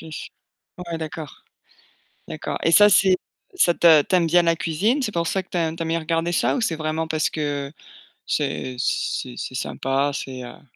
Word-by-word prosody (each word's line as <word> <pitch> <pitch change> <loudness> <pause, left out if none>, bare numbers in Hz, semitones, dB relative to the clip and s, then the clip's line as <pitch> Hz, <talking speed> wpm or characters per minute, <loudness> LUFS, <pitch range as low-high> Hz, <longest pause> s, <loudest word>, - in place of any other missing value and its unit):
Ouais, 165 +2 -10
d'accord, 155 -2 -6 0.9
d'accord. - - -4
Et 165 - +3
ça, 205 +4 +7
c'est 190 -2 +5 0.4
ça 260 - +4
te 165 -3 +6
tu 185 - 0
aimes 170 -2 +3
bien 175 +2 +4
la 165 0 +2
cuisine? 200 - 0
C'est 215 - -2
pour 170 -1 0
ça 190 - 0
que 185 - -34
tu - - -3
as 165 -2 0
tu 165 - -8
aimes - - -4
bien 165 0 0
regarder 165 +1 -1
ça 175 - +1
ou 255 - -1
c'est 170 -7 0
vraiment 155 +1 -2
parce 155 -1 0
que 145 -2 -3 0.5
c'est 130 - -2
c'est 125 -1 -2
c'est 130 - -5
sympa, 135 +2 -1
c'est, 130 -2 -6
heu 120 - -11
165 Hz, 195 wpm, -23 LUFS, 150-175 Hz, 0.9 s, ça